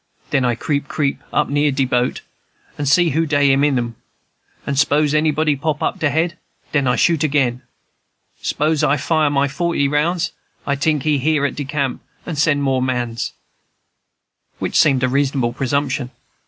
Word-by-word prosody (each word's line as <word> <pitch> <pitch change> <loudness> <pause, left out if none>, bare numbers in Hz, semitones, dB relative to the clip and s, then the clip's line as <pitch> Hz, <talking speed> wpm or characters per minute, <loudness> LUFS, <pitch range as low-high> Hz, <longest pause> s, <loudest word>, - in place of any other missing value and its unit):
Den 135 - +2
I 120 -1 +1
creep 140 +3 -2
creep 140 -1 -1
up - - +1
near 145 +1 +1
de 135 0 +1
boat, 125 -1 0 0.5
and 145 -2 -2
see 170 +2 +4
who 160 +3 +1
dey 145 -2 +3
in 135 +1 +3
'em; 125 -5 0 0.7
and 140 -1 -1
s'pose 150 0 +2
anybody 155 0 +2
pop 150 +1 -2
up - - -2
he 155 - +3
head, 160 +4 -1 0.3
den 140 -3 +1
I 125 - +2
shoot 165 -3 +2
again. 135 -5 +1 0.8
S'pose 155 0 0
I 145 0 +3
fire 155 +1 +1
my 140 0 +1
forty 150 0 0
rounds. 165 +5 0 0.3
I 140 - 0
tink 145 0 0
he 150 -2 +1
hear 150 +1 +1
at 140 - -1
de 145 - -5
camp 140 -2 -2 0.2
and 170 - -4
send 145 -1 +2
more 135 -2 +1
mans," 120 -2 -2 1.2
which - - -4
seemed 135 -4 +4
a - - +4
reasonable 135 -2 0
presumption. 135 0 -1
145 Hz, 170 wpm, -19 LUFS, 135-155 Hz, 1.2 s, see